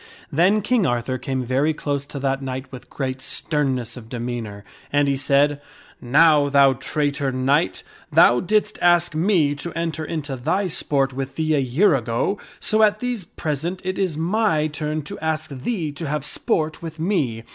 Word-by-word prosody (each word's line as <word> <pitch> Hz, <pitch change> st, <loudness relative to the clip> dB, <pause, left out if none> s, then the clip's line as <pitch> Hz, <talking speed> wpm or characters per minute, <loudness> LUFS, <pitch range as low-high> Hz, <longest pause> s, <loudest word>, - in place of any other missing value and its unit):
/Then 190 Hz, +7 st, +3 dB
King 215 Hz, -4 st, +2 dB
Arthur 120 Hz, +1 st, -1 dB
came 130 Hz, -1 st, -2 dB
very 135 Hz, +5 st, +1 dB
close 140 Hz, -2 st, -3 dB
to 145 Hz, -, -8 dB
that 135 Hz, 0 st, -1 dB
knight 130 Hz, 0 st, -5 dB
with 130 Hz, -2 st, -11 dB
great 130 Hz, -1 st, -4 dB
sternness 135 Hz, -4 st, -1 dB
of 115 Hz, -3 st, -11 dB
demeanor, 115 Hz, -4 st, -5 dB, 0.3 s
and 145 Hz, 0 st, +3 dB
he 140 Hz, -, +2 dB
said, 140 Hz, +1 st, +2 dB, 0.2 s
" -, -, -25 dB
Now, 145 Hz, +3 st, +4 dB
thou 140 Hz, -1 st, +5 dB
traitor 140 Hz, +1 st, -1 dB
knight! 135 Hz, +5 st, +1 dB, 0.3 s
thou 120 Hz, +1 st, +6 dB
didst 210 Hz, +2 st, 0 dB
ask 175 Hz, -1 st, +4 dB
me 160 Hz, -3 st, +2 dB
to 155 Hz, +4 st, -6 dB
enter 165 Hz, -1 st, -3 dB
into 150 Hz, -3 st, -4 dB
thy 185 Hz, +11 st, 0 dB
sport 140 Hz, -6 st, 0 dB
with 135 Hz, 0 st, -5 dB
thee 155 Hz, -1 st, 0 dB
a 150 Hz, -, +3 dB
year 145 Hz, +9 st, +3 dB
ago, 120 Hz, -, -1 dB, 0.2 s
so 215 Hz, 0 st, +2 dB
at 210 Hz, -1 st, +4 dB
these 245 Hz, -6 st, -3 dB
present 160 Hz, +4 st, -4 dB
it 185 Hz, 0 st, -2 dB
is 185 Hz, -6 st, 0 dB
my 170 Hz, -2 st, +1 dB
turn 155 Hz, 0 st, -3 dB
to -, -, -8 dB
ask 160 Hz, -1 st, -2 dB
thee 155 Hz, -, -3 dB
to 155 Hz, +2 st, -6 dB
have 150 Hz, 0 st, -2 dB
sport 155 Hz, +1 st, -1 dB
with 165 Hz, -1 st, -8 dB
me. 155 Hz, -, -1 dB
145 Hz, 180 wpm, -22 LUFS, 135-165 Hz, 0.3 s, thou